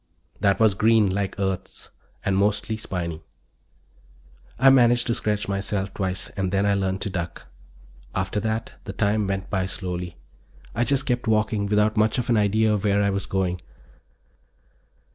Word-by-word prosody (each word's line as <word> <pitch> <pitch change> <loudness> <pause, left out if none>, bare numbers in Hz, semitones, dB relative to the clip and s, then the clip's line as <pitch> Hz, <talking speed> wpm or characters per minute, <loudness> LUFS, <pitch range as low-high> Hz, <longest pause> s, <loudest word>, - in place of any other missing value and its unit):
That 100 -1 +2
was 110 -3 +5
green, 110 0 +3
like 100 0 -2
Earth's, 95 -2 -3 0.3
and 95 - +1
mostly 105 +2 +1
spiny. 85 -7 -4 1.4
I 135 +2 +6
managed 120 -2 +5
to 115 - +1
scratch 105 -3 -1
myself 100 0 -2
twice 95 0 -2
and 95 -2 -3
then 100 0 +1
I 100 - +3
learned 95 -1 -1
to 100 - -2
duck. 85 -2 -5 0.7
After 95 +2 -1
that 110 +1 -2
the - - -5
time 105 0 +1
went 95 0 -3
by 95 -2 0
slowly. 90 -2 -5 0.6
I 120 +3 +1
just 135 0 +1
kept 120 -2 -1
walking, 110 -1 +1
without 105 +1 +2
much 110 +2 +3
of 120 -1 -1
an 115 - +4
idea 105 +1 +3
where 100 0 +1
I 100 - +2
was 100 0 -3
going. 90 -2 -1
100 Hz, 160 wpm, -24 LUFS, 95-110 Hz, 1.4 s, I